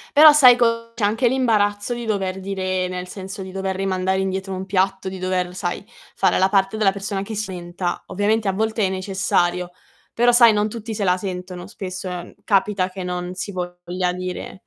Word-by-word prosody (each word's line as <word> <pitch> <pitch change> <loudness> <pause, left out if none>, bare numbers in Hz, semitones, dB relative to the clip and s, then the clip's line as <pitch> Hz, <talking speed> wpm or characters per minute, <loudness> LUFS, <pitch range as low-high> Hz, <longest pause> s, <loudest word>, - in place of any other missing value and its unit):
Però 305 +1 +10
sai 255 -5 +8
co 230 -1 0
c'è 220 - -2
anche 225 +4 +2
l'imbarazzo 215 -4 +1
di 240 0 -5
dover 190 -3 -2
dire 185 -1 -2
nel 180 0 -5
senso 195 +1 -7
di 190 0 -8
dover 190 0 -3
rimandare 190 0 0
indietro 190 0 -2
un 185 0 -4
piatto, 190 0 0
di 190 0 -6
dover, 180 -1 -1
sai, - - -3 0.3
fare - - +2
la 190 - +4
parte 195 +1 +1
della 210 -3 +3
persona 195 0 -3
che 215 +2 -6
si 210 -1 -3
lamenta 175 0 -4
Ovviamente 210 +2 0
a - - +2
volte 220 +1 0
è - - 0
necessario, 185 -2 0 0.4
però 240 +1 +4
sai, 235 -1 +7
non 210 0 +1
tutti 225 0 -6
se 205 - -2
la 180 -1 +3
sentono. 180 -1 -6
Spesso, 185 0 -6
ehm, 180 -1 -7
capita 195 -2 +1
che 190 0 -7
non 180 0 -4
si 200 +2 -5
voglia 180 0 -3
dire 185 +1 -6
190 Hz, 195 wpm, -21 LUFS, 185-210 Hz, 0.4 s, Però